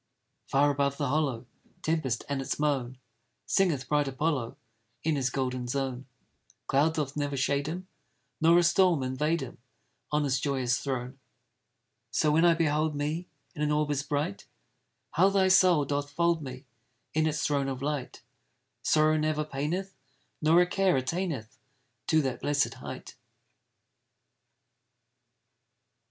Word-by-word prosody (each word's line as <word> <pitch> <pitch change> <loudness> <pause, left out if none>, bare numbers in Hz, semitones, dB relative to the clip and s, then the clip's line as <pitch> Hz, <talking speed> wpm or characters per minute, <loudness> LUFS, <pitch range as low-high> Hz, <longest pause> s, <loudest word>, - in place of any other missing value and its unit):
Far 145 +2 +3
above 140 0 0
the 145 -3 -1
hollow 135 -5 0 0.4
Tempest, 155 -8 0
and 140 -1 -2
its 135 - -3
moan, 135 -4 -1 0.5
Singeth 160 -10 +1
bright 145 0 +2
Apollo 135 -3 -1 0.5
In 160 -1 +1
his 135 -2 0
golden 125 -1 -2
zone, 130 0 -3 0.6
Cloud 150 +4 +2
doth 145 -3 -2
never 145 -1 -2
shade 140 +2 0
him, 180 +4 -5 0.5
Nor 165 +2 +6
a 175 - +5
storm 170 -4 +3
invade 150 +5 0
him, 125 -2 -8 0.5
On 150 0 +2
his 130 -2 +1
joyous 130 -3 0
throne. 130 -1 -4 0.9
So 150 - +2
when 165 +3 +4
I 170 -1 +5
behold 155 -1 +1
me 155 +5 -2 0.3
In 150 - -7
an 150 0 +1
orb 150 0 +1
as 145 -1 0
bright, 145 -8 -3 0.6
How 185 +6 +4
thy 195 -1 +3
soul 185 -5 +5
doth 145 +1 -2
fold 170 +2 +1
me 130 0 -8 0.5
In 155 0 +2
its 155 0 -1
throne 140 -2 +1
of 135 -1 -4
light! 145 -3 -4 0.6
Sorrow 155 0 +3
never 155 0 0
paineth, 160 +7 -3 0.5
Nor 160 +3 +5
a - - +4
care 190 -2 +2
attaineth 135 - -3 0.5
To 155 -1 +3
that 130 -2 -3
blessed 145 -1 +1
height. - - -9
145 Hz, 140 wpm, -28 LUFS, 135-160 Hz, 0.9 s, Nor